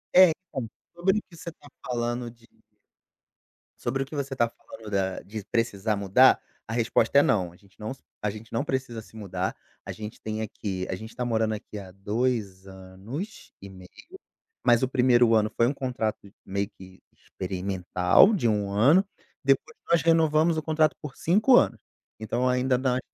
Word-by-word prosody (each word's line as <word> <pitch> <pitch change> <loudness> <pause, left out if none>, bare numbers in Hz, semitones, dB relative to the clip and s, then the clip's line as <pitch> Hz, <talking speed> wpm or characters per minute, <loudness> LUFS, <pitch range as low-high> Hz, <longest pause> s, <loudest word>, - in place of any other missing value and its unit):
É, 185 -1 +9
então, 140 -10 -6 0.3
sobre 190 +4 +2
o - - -12
que 170 - -15
você 170 - -7
tá 145 - -19 0.2
falando 120 0 -2
de 115 0 -22 1.3
sobre 135 +3 -1
o - - -10
que 150 - -9
você 135 -1 -3
tá 120 -2 +2
falando 110 -1 -12
da 95 -2 -1
de 105 0 -7
precisar 110 -2 0
mudar, 100 +6 +5 0.3
a 110 - -4
resposta 115 +2 +3
é - - +7
"não", 90 -5 +1
a - - -18
gente 100 +2 -25
não 110 - -5
s 135 - -10 0.2
a 105 - +1
gente 110 +1 -11
não 115 - 0
precisa 130 -5 -3
se 110 - -18
mudar. 95 -3 -3 0.3
A - - -5
gente 105 0 -8
tem 110 0 -4
aqui 95 -3 -4
a - - -1
gente 110 +4 -10
tá 125 - -2
morando 110 -2 +1
aqui 105 0 -7
há 95 -2 -9
2 100 -1 -2
anos 95 - -8
e 100 - -9
meio, 95 -1 -13 0.8
mas 120 0 +5
o 130 - +3
1º 120 -3 +4
ano 110 0 +2
foi 115 - +3
um 140 - 0
contrato 120 -6 -3 0.2
meio 100 +1 -2
que 95 -1 -15
experimental 95 - +2
de 160 - +1
1 105 -2 0
ano. 140 - +4 0.4
Depois 135 0 +1
nós 170 - +5
renovamos 160 0 +3
o 155 - -2
contrato 155 0 +2
por 150 -3 -8
5 215 +9 +4
anos. - - +3 0.4
Então, 120 +4 0
ainda 125 +1 +2
n 130 +1 -2
ainda 130 - 0
115 Hz, 185 wpm, -26 LUFS, 100-135 Hz, 1.3 s, É